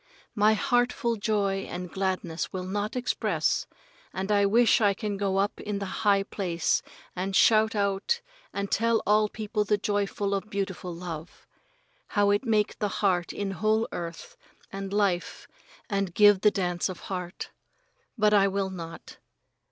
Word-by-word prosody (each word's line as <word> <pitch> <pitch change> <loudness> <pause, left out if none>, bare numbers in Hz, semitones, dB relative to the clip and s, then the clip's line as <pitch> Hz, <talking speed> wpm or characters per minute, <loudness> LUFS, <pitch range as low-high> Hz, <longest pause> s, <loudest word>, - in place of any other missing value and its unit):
My 215 0 +4
heartful 245 -2 +1
joy 200 -2 0
and 180 -1 -6
gladness 185 -4 -2
will 185 -1 -4
not 205 +4 -3
express, 250 0 0 0.4
and 190 +2 -3
I 200 -1 +4
wish 235 +3 +4
I 200 -2 +3
can 210 -2 -3
go 195 -1 -1
up 200 +2 0
in 205 -1 -3
high 200 0 +1
place 175 -5 -1 0.3
and 190 +2 -2
shout 220 +1 +5
out 200 - 0 0.3
and 200 0 -4
tell 230 +1 +2
all 210 0 +3
people 215 0 -2
the 210 0 +1
joyful 205 0 -1
of 200 +2 -2
beautiful 190 -3 -3
love. 170 -1 -8 0.7
How 205 0 +4
it 205 +5 +1
make 215 -2 +1
the 210 - 0
change 185 -3 0
in 200 -1 -3
whole 215 +4 +1
earth 170 -1 -6 0.4
and 195 0 -5
life 200 -4 0 0.4
and 195 -4 -2
give 205 -2 +6
the 210 - +6
dance 180 -2 -1
of 185 - -7
heart. 180 -2 -6 0.7
But 210 -1 +3
I 200 -1 +5
will 195 0 -1
not. 165 -2 -9
200 Hz, 150 wpm, -27 LUFS, 190-210 Hz, 0.7 s, give